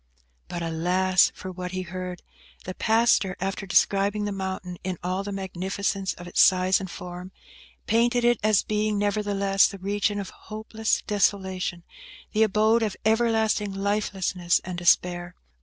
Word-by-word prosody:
But 170 -1 -5
alas! 180 +3 +2
for 185 - -7
what 180 0 -6
he 185 0 -2
heard. 180 0 -6 0.4
The 185 - -5
pastor, 220 -3 +2
after 195 +1 -3
describing 200 +3 +2
the 205 - -2
mountain 190 -2 -5
in 185 -1 -3
all 185 +2 -1
the 205 - -5
magnificence 195 0 -2
of 175 - -10
its 175 - +2
size 185 0 +4
and 190 -2 -6
form, 180 +1 -8 0.5
painted 240 +2 +2
it 240 -1 +3
as 215 -1 +3
being, 210 0 0
nevertheless, 200 -1 +2
the 200 - -8
region 205 +2 -1
of 195 - -6
hopeless 220 +1 -3
desolation; 190 -4 0 0.5
the 215 - +1
abode 220 +2 +3
of 215 -4 -2
everlasting 220 -3 +1
lifelessness 195 -3 0
and 180 -1 -5
despair. 175 0 +2
195 Hz, 145 wpm, -25 LUFS, 185-210 Hz, 0.5 s, size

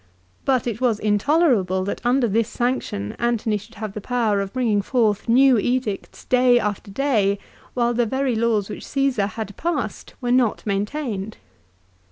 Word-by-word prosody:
But 260 -3 +2
it 235 -1 -3
was 240 -4 +2
intolerable 210 - +2
that 200 - -4
under 245 +1 +2
this 225 +2 +1
sanction 240 - -2
Antony 235 -2 0
should 215 +3 -14
have 215 -2 -5
the 210 - -6
power 220 -3 0
of 195 -1 -4
bringing 230 -5 +1
forth 220 -1 0
new 255 0 +5
edicts 245 -3 -2
day 250 -1 +4
after 205 -1 -3
day, 205 -4 +1 0.4
while 240 -1 +1
the 240 0 +1
very 265 +2 0
laws 220 -3 +1
which - - -8
Caesar 270 -8 +1
had 210 -2 -6
passed 295 - -3
were 245 -2 -2
not 245 -3 +2
maintained. 210 0 -3
230 Hz, 160 wpm, -22 LUFS, 205-255 Hz, 0.4 s, new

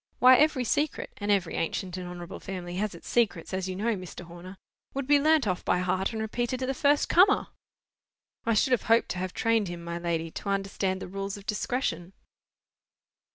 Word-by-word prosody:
Why, 255 +1 +8
every 300 -4 +3
secret 290 +5 -1
(and 205 0 -4
every 195 -5 +2
ancient 180 +2 -2
and 180 -1 -5
honourable 175 0 -8
family 180 -2 -6
has 205 -2 -2
its 170 - -12
secrets, 205 -8 0
as 190 0 -2
you 185 - -3
know, 220 +4 0
Mr. 185 -2 -8
Horner) 175 +3 -11 0.4
would 275 -1 -2
be 290 +1 +5
learnt 310 -2 +4
off 185 -3 -1
by - - +2
heart, 185 +2 0
and 220 - -4
repeated 240 +3 -2
to - - 0
the 270 - -1
first 285 +2 +2
comer!" 375 +3 +4 0.9
"I 230 -1 +1
should 260 +5 +2
have 250 - +3
hoped 230 +1 +4
to 180 - -3
have 185 0 -3
trained 225 -1 +1
him, 175 -1 -6
my 170 0 -4
lady, 165 -1 -2
to 200 - -6
understand 195 -1 -1
the - - -6
rules 195 +2 -4
of 200 - -13
discretion." 205 -6 -2
195 Hz, 200 wpm, -28 LUFS, 180-240 Hz, 0.9 s, Why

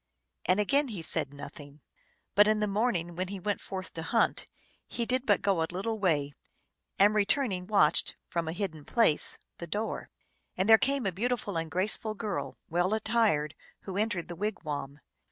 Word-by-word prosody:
And 185 +3 +3
again 280 +8 +3
ho 205 -8 -5
said 140 -3 -1
nothing; 145 0 -10 0.5
but 205 +1 +6
in 215 0 +3
the 210 - +2
morning, 200 -5 0
when 185 +1 -2
he 195 +1 -5
went 205 +2 -2
forth 185 -1 -6
to 165 - -4
hunt, 230 +8 +1 0.4
he 235 - -2
did 255 +2 -1
but 205 - +3
go 195 -5 +2
a 160 - +1
little 215 +5 -3
way, 150 -7 +1 0.6
and, 205 +2 +5
return 215 +4 +2
ing, 180 -1 -4
watched, 205 -1 +4
from 170 -2 -2
a - - -1
hidden 170 -5 -4
place, 220 -4 +2 0.2
the 170 - -6
door. 210 +6 -3 0.5
And 185 +2 +1
there 220 0 +8
came 275 -2 +1
a 195 - +1
beautiful 215 0 -2
and 165 -1 -2
graceful 210 +4 0
girl, 210 -3 -4
well 175 +5 +1
attired, 220 -9 +1 0.3
v/ho 190 - -6
entered 205 -4 -1
the 175 - -6
wigwam. 150 -8 -4
195 Hz, 180 wpm, -29 LUFS, 170-215 Hz, 0.6 s, there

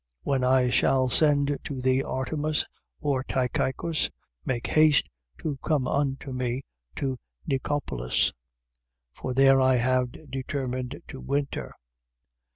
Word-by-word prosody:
When 135 -2 +1
I 125 -1 +4
shall 130 0 +3
send 145 0 +3
to 135 -3 -5
thee 130 +1 +2
Artemas 150 +4 -1 0.4
or 140 -3 0
Tychicus, 130 +4 0 0.3
make 120 -2 -2
haste 155 -2 +4 0.4
to 145 -3 -2
come 145 -5 +1
unto 135 -1 -1
me 125 +1 -2 0.3
to 130 -2 -2 0.3
Nicopolis. 135 - 0 0.8
For 125 - -4
there 135 0 +6
I 130 0 +5
have 130 +3 0
determined 130 -1 -3
to 135 - -8
winter. 140 0 -2
135 Hz, 115 wpm, -27 LUFS, 130-145 Hz, 0.8 s, there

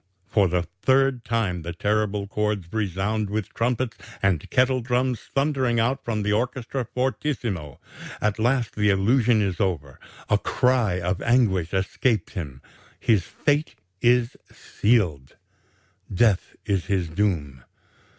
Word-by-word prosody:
"For 100 -3 +2
the 90 0 0 0.2
third 135 -2 +3
time 110 -7 -1
the 85 +1 -5
terrible 105 +1 0
chords 105 -3 -2
resound 105 0 -1
with 105 -1 -3
trumpets 120 +1 -1 0.2
and 95 -6 0
kettle 130 0 +2
drums 125 0 0 0.2
thundering 135 -4 +1
out 130 +4 0
from 110 -3 -2
the 105 0 +1
orchestra 125 +2 -2
fortissimo. 115 - -2 0.4
At 105 +1 0
last 120 0 +1
the 105 -1 +2
illusion 110 +3 +3
is 95 -3 -2
over. 75 -9 -2 0.3
A - - +3
cry 120 -8 +1
of 90 +2 -2
anguish 105 -9 +2
escapes 95 +2 0
him. 70 -10 -6 0.4
His 110 -5 +2
fate 145 -2 0 0.3
is 120 0 +3 0.2
sealed. 90 - 0 0.8
Death 100 0 +2
is 95 -2 -1
his 95 -4 0
doom. 80 -8 -1
105 Hz, 130 wpm, -24 LUFS, 95-125 Hz, 0.8 s, third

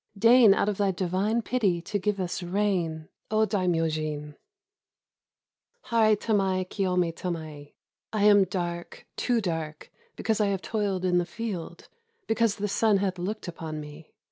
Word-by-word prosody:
Deign 230 -1 +7
out - - +1
of 205 -2 -1
thy 200 -1 +2
divine 190 +5 0
pity 210 -9 +1
to 205 +5 -3
give 205 +1 -1
us 180 0 -3
rain, 175 -4 -1 0.2
O 220 0 +3
Daimyojin!" 155 -6 -1 0.7
— 485 +1 -44
"Harai 220 -2 +4
tamai 190 -4 +1
kiyome 180 -4 0
tamael... 155 -5 -6 0.4
I 215 -2 0
am 205 -2 +6
dark, 175 -2 -5
too 245 -2 +1
dark, 160 -6 -4 0.2
because 220 -1 0
I 210 - +3
have 195 -1 -2
toiled 200 -4 -1
in 180 -1 +3
the 175 - 0
field, 210 -8 -6 0.4
because 225 -2 +1
the 205 0 -2
sun 210 +1 +3
hath 190 -2 -1
looked 205 +4 -4
upon 160 -2 -6
me. 150 +1 -11
190 Hz, 150 wpm, -27 LUFS, 170-210 Hz, 0.7 s, Deign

